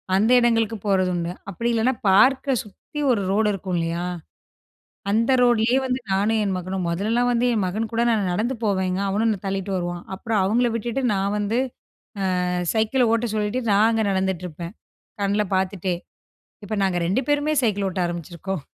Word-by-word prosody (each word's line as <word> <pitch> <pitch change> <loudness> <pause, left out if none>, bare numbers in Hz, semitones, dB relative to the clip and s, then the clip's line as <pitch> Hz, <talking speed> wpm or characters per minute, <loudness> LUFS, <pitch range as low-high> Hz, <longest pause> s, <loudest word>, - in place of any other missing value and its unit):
அந்த 215 +4 +3
எடங்களுக்கு 225 -2 +2
போறது 185 -2 +2
உண்டு. 170 0 -2 0.2
அப்டி 230 +6 -2
இல்லன்னா 235 +3 +2 0.2
பார்க்க 265 +7 +4
சுத்தி 215 +8 -10
ஒரு 225 -5 +1
ரோடு 210 +1 +2
இருக்கும்லயா, 175 -2 -2 1.1
அந்த 230 +5 +2
ரோடுலயே 240 +1 +3
வந்து, 255 0 -1
நானும் 210 +3 +2
என் 195 -2 -1
மகனும் 185 0 -3
மொதலெல்லாம் 225 +8 +1
வந்து 240 +1 +1
என் 210 - +1
மகன் 220 +4 -2
கூட 230 - +1
நானு 215 -3 +1
நடந்து 230 +7 -1
போவேங்க. 190 -2 0
அவனும் 215 +4 +1
என்ன 210 - -1
தள்ளிட்டு 195 0 -2
வருவான். 175 -1 -4
அப்புறம் 220 +1 -1
அவங்கள 240 +4 +2
விட்டுட்டு 240 +4 -2
நான் 195 +2 0
வந்து, 210 +4 0 0.9
அ - - -1 0.3
சைக்கிள 225 +2 +2
ஓட்ட 230 0 0
சொல்லிட்டு, 210 +4 -1
நான் 210 +3 +5
அங்க 225 -1 +1
நடந்துட்டுருப்பேன், 180 -2 -3 0.5
கண்ல 205 +1 +1
பாத்துட்டே. 185 -1 -1 0.7
இப்ப 215 - -3
நாங்க 180 -2 +1
2 195 +9 +1
பேருமே 290 +1 +1
சைக்கிள் 205 -3 +1
ஓட்ட 185 - -3
ஆரம்பிச்சிருக்கோம். 175 0 -5
205 Hz, 160 wpm, -23 LUFS, 190-230 Hz, 1.1 s, நான்